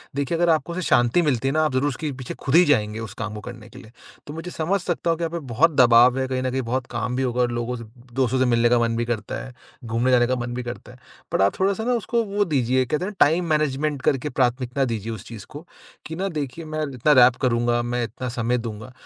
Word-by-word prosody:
देखिए 140 +4 -1
अगर 175 0 +2
आपको 160 +1 +1
उससे 185 - -3
शांति 120 +8 +4
मिलती 135 -5 0
है 135 - 0
ना 155 0 +2
आप 150 - -1
ज़रूर 135 +3 +1
उसके 145 +2 -4
पीछे 130 -1 -7
खुद 135 - +1
ही 175 - +8
जाएँगे 110 -7 +1
उस 110 -3 -7
काम 105 -1 -4
को 105 - -7
करने 115 -3 -11
के 125 - -13
लिए। 110 -3 -15 0.4
तो 145 - -7
मुझे 165 +3 -7
समझ 175 +5 0
सकता 175 -1 -2
हूँ 165 - +2
कि 170 - -4
आप 165 - -2
पे 170 - -3
बहुत 160 +8 +4
दबाव 125 +1 +6
है। 130 - -1
कहीं 130 -1 -2
न 130 - -1
कहीं 130 +1 -1
बहुत 130 0 -1
काम 125 +2 -2
भी 130 - 0
होगा 125 0 0
और 120 -1 +1
लोगों 120 +1 -3
से 115 - -8 0.3
दोस्तों 130 0 +1
से 130 - +3
मिलने 120 -1 +3
का 120 0 +4
मन 115 -1 0
भी 120 - 0
करता 110 -3 -4
है, 130 - -11 0.3
घूमने 115 +3 0
जाने 120 -1 +4
का 130 - +1
मन 120 0 -4
भी 125 +1 -4
करता 120 -3 -8
है। - - -17 0.3
बट - - +2
आप 100 +1 +2
थोड़ा-सा 195 +3 +1
ना 250 +2 +1
उसको 235 0 0
वो 205 0 0
दीजिए, 130 -5 +1
कहते 150 +8 -2
हैं 210 - -4
ना - - -16
टाइम 165 +4 +1
मैनेजमेंट 150 -1 0
करके 135 +2 0
प्राथमिकता 125 +1 0
दीजिए 115 -2 -3
उस 110 - -8
चीज़ 110 -5 -9
को 150 +4 -10 0.4
कि 160 - -6
ना 190 +3 -2
देखिए 145 +4 -5
मैं 155 0 -3
इतना 130 +4 +2
रैप 125 0 +3
करूँगा, 120 -2 +1
मैं 120 0 -2
इतना 120 +3 -5
समय 120 0 -1
दूँगा, 115 0 -7
130 Hz, 270 wpm, -23 LUFS, 120-155 Hz, 0.4 s, ही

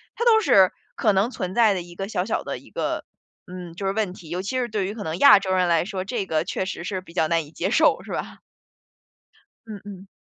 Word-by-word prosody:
它 - - -2
都 450 -2 +6
是 195 - +5 0.2
可 210 - +2
能 200 +6 +1
存 185 -5 -5
在 225 -3 +5
的 185 - -2
一 175 0 -12
个 195 +2 -4
小 180 -4 -1
小 220 - -2
的 - - -4
一 - - -18
个， - - -3 0.4
嗯， 180 -2 -8
就 195 +3 -4
是 195 - 0
问 210 -3 -1
题， 175 -4 -13
尤 175 +2 -3
其 255 +6 -2
是 245 - -1
对 210 -4 -2
于 200 - -4
可 215 -2 -7
能 160 +1 -3
亚 280 -2 +8
洲 190 -1 -3
人 185 -1 +2
来 165 -1 +3
说， 190 -2 -4
这 200 +1 -3
个 155 -2 0
确 185 - -3
实 185 - -5
是 185 +2 -3
比 175 -2 -16
较 160 -3 +1
难 165 -2 +1
以 - - -16
接 180 +4 -2
受， 315 +6 +3
是 - - -10
吧？ - - -5 1.3
嗯， 215 -2 -8
嗯。 195 -1 -10
190 Hz, 275 characters per minute, -24 LUFS, 180-215 Hz, 1.3 s, 亚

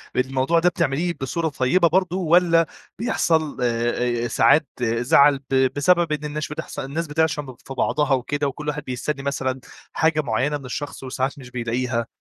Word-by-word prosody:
الموضوع 135 +5 +1
ده 180 - +4
بتعمليه 170 0 -1
بصورة 160 +5 -1
طيبة 170 +6 +2
برضه، 185 +1 +1
والّا 170 -1 +4 0.3
بيحصل، 160 - 0
آآ، 120 0 0
ساعات 150 +5 +4
زعل 120 +4 +4
ب 130 -1 +2
بسبب 170 +2 +3
إن 150 0 -2
الناس 150 0 -4
بتحص 150 - -6
الناس 150 +5 -3
بتعشم 150 -1 0
ب 130 -2 -10
في 135 - -7
بعضها 145 +2 +1
وكده، 140 +3 -1
وكلّ 150 +3 -6
واحد 150 -1 -2
بيستني 135 +2 -4
مثلًا، 130 -2 -2 0.3
حاجة 160 -1 +2
معينة 130 +4 0
من 140 - -12
الشخص، 140 +2 -6
وساعات 130 +2 -3
مش 125 -2 -12
بيلاقيها؟ 120 0 -2
140 Hz, 160 wpm, -22 LUFS, 130-160 Hz, 0.3 s, ده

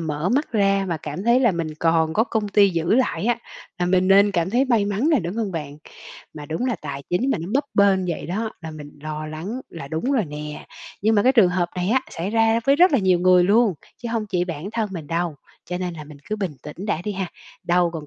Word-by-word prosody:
mở 155 +1 -2
mắt 270 +4 0
ra 195 -2 +2
mà 170 - -1
cảm 150 +3 -6
thấy 240 +2 +4
là 235 -6 +4
mình 160 -2 -3
còn 165 -1 +2
có 220 +6 +2
công 220 -4 -2
ty 200 0 +5
giữ 170 +2 +1
lại 250 -4 +1
á, 240 -1 +2 0.4
là 175 - 0
mình 185 +1 +2
nên 200 +1 +6
cảm 175 -1 0
thấy 250 +5 +3
may 235 -6 +2
mắn 205 +8 0
nè, 300 -7 +4
đúng 175 +3 -5
hông 215 -4 -2
bạn? 150 -4 -5 0.6
Mà 150 -1 -8
đúng 160 +11 -2
là 245 - 0
tài 140 0 -5
chính 245 +10 +1
mà - - +1
nó 165 - -6
bấp 280 - +2
bênh 195 -2 +4
vậy 170 -3 -3
đó, 215 +6 -2
là 160 -2 -7
mình 150 -1 -11
lo 155 0 -5
lắng 170 +11 -5
là 140 -5 -9
đúng 160 - -1
rồi 245 -7 +2
nè. 150 -1 -7 0.4
Nhưng 220 +1 +3
mà 205 - +4
cái 255 - +4
trường 220 -8 +5
hợp 180 -1 0
này 180 +1 -1
á, 260 +2 +3
xảy 175 +4 -4
ra 225 +1 +3
với 275 +1 +5
rất 360 +2 +5
là 275 - +4
nhiều 185 -3 +3
người 180 0 +5
luôn, 210 +1 +4 0.3
chứ 235 - -3
hông 225 -2 -1
chỉ 180 -3 0
bản 170 +1 -5
thân 225 -2 -1
mình 165 -5 -6
đâu, 165 0 -1 0.3
cho 180 0 -4
nên 180 -1 -3
là 155 -2 -8
mình 145 -1 -13
cứ 215 - -1
bình 195 -7 -3
tĩnh 170 +7 -8
đã 175 -5 -1
đi 210 - -2
ha, 190 -2 -3 0.4
đâu 175 0 +2
còn 155 -3 -6
185 Hz, 260 wpm, -22 LUFS, 165-220 Hz, 0.6 s, nên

